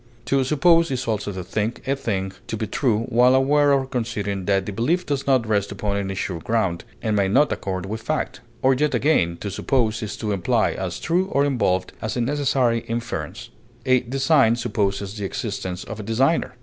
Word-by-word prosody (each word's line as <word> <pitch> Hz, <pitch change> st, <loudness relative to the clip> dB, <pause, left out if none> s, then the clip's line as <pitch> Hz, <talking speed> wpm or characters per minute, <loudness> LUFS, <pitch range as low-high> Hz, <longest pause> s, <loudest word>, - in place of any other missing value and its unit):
To 135 Hz, +1 st, +2 dB
suppose 165 Hz, +4 st, +4 dB
is 130 Hz, -2 st, -3 dB
also 105 Hz, -2 st, -1 dB
to 95 Hz, -2 st, -5 dB
think 110 Hz, +7 st, -3 dB
a 135 Hz, -, +2 dB
thing 95 Hz, -8 st, -2 dB, 0.2 s
to 110 Hz, -, -3 dB
be 110 Hz, -, -2 dB
true 110 Hz, -1 st, +1 dB
while 125 Hz, +2 st, +5 dB
aware 145 Hz, +2 st, +4 dB
or 135 Hz, -1 st, +3 dB
conceding 105 Hz, -7 st, -3 dB
that 95 Hz, -1 st, +1 dB
the 105 Hz, -, -4 dB
belief 160 Hz, -, 0 dB
does 140 Hz, -1 st, -2 dB
not 130 Hz, -4 st, +3 dB
rest 100 Hz, -2 st, 0 dB
upon 100 Hz, 0 st, -2 dB
any 95 Hz, -1 st, -2 dB
sure 95 Hz, -2 st, -3 dB
ground, 95 Hz, -3 st, -1 dB, 0.2 s
and 110 Hz, -2 st, +1 dB
may 100 Hz, -2 st, +2 dB
not 145 Hz, +10 st, +3 dB
accord 95 Hz, -1 st, -3 dB
with 110 Hz, +3 st, -5 dB
fact; -, -, -2 dB, 0.2 s
or 130 Hz, +1 st, +5 dB
yet 150 Hz, +3 st, +1 dB
again, 85 Hz, -, +2 dB
to 100 Hz, -, -4 dB
suppose 115 Hz, +1 st, 0 dB
is 110 Hz, -, -5 dB
to 105 Hz, -2 st, -3 dB
imply 110 Hz, +4 st, +1 dB
as 95 Hz, -2 st, -4 dB
true 175 Hz, +3 st, +1 dB
or 140 Hz, -6 st, +2 dB
involved 100 Hz, -9 st, 0 dB
as 110 Hz, +2 st, -3 dB
a -, -, +1 dB
necessary 130 Hz, -3 st, +1 dB
inference; 115 Hz, +1 st, -4 dB, 0.3 s
as, 130 Hz, -1 st, +4 dB
design 135 Hz, -3 st, +4 dB
supposes 100 Hz, -4 st, -1 dB
the 100 Hz, -, -2 dB
existence 95 Hz, -3 st, -4 dB
of 110 Hz, -1 st, -7 dB
a -, -, -5 dB
designer. 130 Hz, +5 st, +1 dB
115 Hz, 200 wpm, -23 LUFS, 100-135 Hz, 0.3 s, while